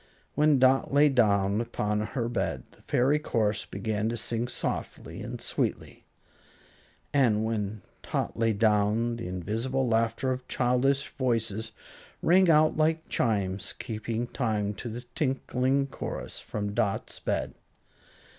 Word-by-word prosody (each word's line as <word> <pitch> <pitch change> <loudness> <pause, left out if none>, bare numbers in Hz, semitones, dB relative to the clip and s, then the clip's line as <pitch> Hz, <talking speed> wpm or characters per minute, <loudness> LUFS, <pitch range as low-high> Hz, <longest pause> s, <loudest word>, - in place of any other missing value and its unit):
When 150 -1 +4
Dot 130 +1 +4
lay 145 +2 +5
down 100 -5 +3
upon 105 -3 -1
her 115 +2 -2
bed, 120 - -2
the - - -20
fairy 140 +5 +2
chorus 110 -7 0
began 105 +2 -2
to 120 - -2
sing 115 +1 -2
softly - - -4
and - - -6
sweetly; - - -3 1.1
and 115 -6 +3
when 105 -2 -3 0.2
Tot - - -2
lay 115 0 +2
down 110 +2 +2
the 115 - -5
invisible 115 +9 -1
laughter 115 +3 +1
of 130 0 -4
childish 130 +3 +2
voices 115 -4 -1 0.5
rang 185 +2 +5
out 155 -1 +5
like 160 +1 +1
chimes, 100 -4 -1
keeping 115 +1 -3
time 110 -4 -1
to 120 - -6
the 115 +2 -6
tinkling 135 -1 0
chorus 135 - -5
from 105 -1 -4
Dot's 100 -1 -1
bed. - - -2
115 Hz, 130 wpm, -28 LUFS, 105-130 Hz, 1.1 s, lay